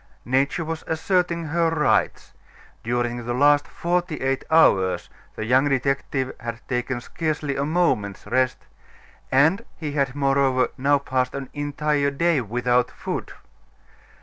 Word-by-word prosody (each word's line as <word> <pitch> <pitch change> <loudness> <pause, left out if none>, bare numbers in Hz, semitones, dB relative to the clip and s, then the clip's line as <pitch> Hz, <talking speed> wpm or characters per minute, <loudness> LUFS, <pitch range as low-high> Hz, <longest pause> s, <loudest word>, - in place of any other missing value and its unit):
Nature 135 +6 +1
was 165 0 -4
asserting 170 +1 0
her 165 +2 +1
rights; 150 -4 0 0.5
during 120 +1 -1
the 120 +1 -2
last 145 +2 +4
forty 175 -1 -1
eight 135 0 -1
hours, 95 - +3 0.2
the 110 - -4
young 130 +5 +3
detective 135 0 -1
had 115 -1 -5
taken 125 0 -2
scarcely 150 +1 -3
a 140 - -1
moment's 145 - 0
rest, 130 0 +1 0.7
and 160 +11 +4
he 150 -3 -4
had, 140 -2 -1
moreover, 135 -2 +2
now 140 +2 +3
passed 130 -2 -1
an 135 -2 -5
entire 145 0 0
day 160 +1 +1
without 125 +2 +1
food. - - -5
140 Hz, 130 wpm, -23 LUFS, 125-155 Hz, 0.7 s, last